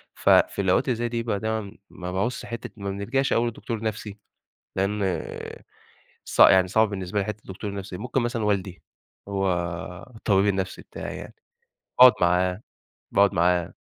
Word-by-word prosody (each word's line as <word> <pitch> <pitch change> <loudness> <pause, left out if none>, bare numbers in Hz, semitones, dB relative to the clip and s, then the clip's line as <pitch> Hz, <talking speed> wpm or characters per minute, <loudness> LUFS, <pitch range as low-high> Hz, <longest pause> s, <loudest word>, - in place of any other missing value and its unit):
ففي 100 - +4
الأوقات 95 -1 +3
اللي 125 - +2
زي 120 +1 -2
دي 120 - -3
بيبقى 105 -4 -1
دايمًا 110 -2 -3 0.2
ما 90 0 -7
باعوزش 100 +7 -2
حتّة 115 -1 -6
ما 100 -1 -4
بنلجأش 115 +8 0
أوي 115 - +2
للدكتور 115 0 -4
النفْسي، 105 -1 -5 0.6
لإن 100 +2 0 1.2
ص - - -7
يعني 95 -1 +8
صعب 110 +3 +3
بالنسبة 95 0 -3
لي 100 - -1
حتّة 105 0 -5
الدكتور 100 +2 -7
النفْسي، 95 -2 -6
ممكن 125 +3 -1
مثلًا 120 -2 -2
والدي 100 -3 -1 0.4
هو 95 -1 -1 0.7
الطبيب 100 -2 +2
النفْسي 95 -1 -1
بتاعي - - -7
يعني، - - -10 0.6
باقعد 125 -1 +10
معاه 90 +3 +2 0.5
باقعد 100 0 +4
معاه 85 0 +1
100 Hz, 155 wpm, -25 LUFS, 95-110 Hz, 1.2 s, باقعد